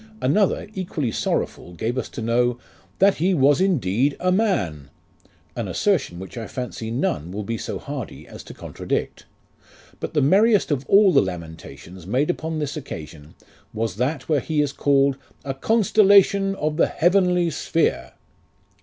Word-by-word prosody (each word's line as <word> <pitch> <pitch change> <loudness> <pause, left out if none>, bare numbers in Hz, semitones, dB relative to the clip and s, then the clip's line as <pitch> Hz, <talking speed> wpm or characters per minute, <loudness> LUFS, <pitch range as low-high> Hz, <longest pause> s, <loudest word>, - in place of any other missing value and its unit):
Another, 185 +12 +1
equally 165 - -3
sorrowful, 90 - -2
gave 110 +8 -2
us 130 - -3
to 115 - -6
know, 120 +1 +1 0.4
"that 195 +1 +4
he 185 +4 +2
was 145 +2 +4
indeed 140 - +1
a 185 0 +1
man;" 95 - 0 0.7
an - - -3
assertion 170 - 0
which 95 +6 -8
I 115 - -6
fancy 125 -3 -5
none 90 - -2
will 105 +2 -4
be 115 +3 -3
so - - -4
hardy 140 -6 -7
as - - -11
to - - -10
contradict. - - -4 0.7
But - - -6
the 150 - +3
merriest 200 +5 +4
of 140 -1 -1
all 195 -2 +5
the - - +6
lamentations 85 -1 -8
made 135 - +1
upon 160 -2 -4
this 145 -2 -3
occasion 80 - -9 0.4
was 110 -3 -2
that 130 +3 -2
where 155 -3 +2
he 155 +3 -2
is 145 -2 +1
called 140 -1 +2 0.3
"a 135 - -2
constellation 200 +2 +4
of 150 -3 -2
the - - +4
heavenly 180 -1 +2
sphere." 60 - -1
140 Hz, 155 wpm, -22 LUFS, 110-180 Hz, 0.7 s, the